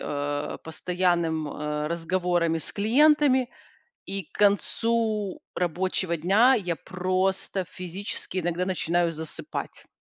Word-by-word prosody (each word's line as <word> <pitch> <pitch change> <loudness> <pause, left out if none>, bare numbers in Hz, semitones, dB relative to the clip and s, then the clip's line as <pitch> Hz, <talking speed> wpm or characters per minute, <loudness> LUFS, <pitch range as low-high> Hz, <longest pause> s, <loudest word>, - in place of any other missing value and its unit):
э, 145 0 -3
постоянным, 170 -2 0
э, 150 0 -3
разговорами 170 0 0
с - - -6
клиентами, 260 +3 +4 0.6
и 195 0 -2
к - - -32
концу 210 0 +1
рабочего 180 0 0
дня 200 +10 +5
я 180 -7 -1
просто 185 +1 -1
физически 185 +2 -5
иногда 175 +1 -1
начинаю 175 -2 +1
засыпать. 160 -1 -6
180 Hz, 100 wpm, -26 LUFS, 165-200 Hz, 0.6 s, дня